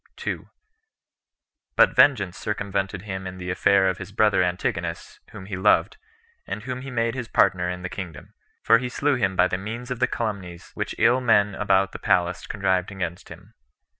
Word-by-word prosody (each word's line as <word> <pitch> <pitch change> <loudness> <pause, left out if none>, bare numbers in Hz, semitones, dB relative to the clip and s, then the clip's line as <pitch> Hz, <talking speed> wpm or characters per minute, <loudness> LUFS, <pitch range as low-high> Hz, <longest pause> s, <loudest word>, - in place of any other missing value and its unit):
2. - - -5 1.3
But - - +5
vengeance 100 -10 +4
circumvented 100 -2 -3
him 95 -2 -5
in 90 0 -7
the 90 -1 -4
affair 95 +1 +3
of 95 - -1
his 95 +1 -8
brother 105 -1 +3
Antigonus, 85 -1 -3
whom 95 - -10
he 100 -1 -5
loved, 95 - +2 0.5
and 105 - -5
whom 125 0 -5
he 135 - -7
made 115 -2 0
his 125 -3 -5
partner 90 -4 +2
in 90 0 -5
the - - -2
kingdom; 90 -4 -8 0.3
for 115 +1 +5
he 125 0 -4
slew 145 +4 0
him 100 -7 0
by 90 - +4
the 95 - -3
means 115 +5 -6
of 125 - -3
the 125 - +3
calumnies 100 -7 -5
which - - -4
ill 125 +2 +4
men 105 -4 +3
about 95 -1 +2
the - - -8
palace 85 0 0
contrived 95 -3 0
against 90 -3 -5
him. - - -13
100 Hz, 185 wpm, -24 LUFS, 90-115 Hz, 1.3 s, But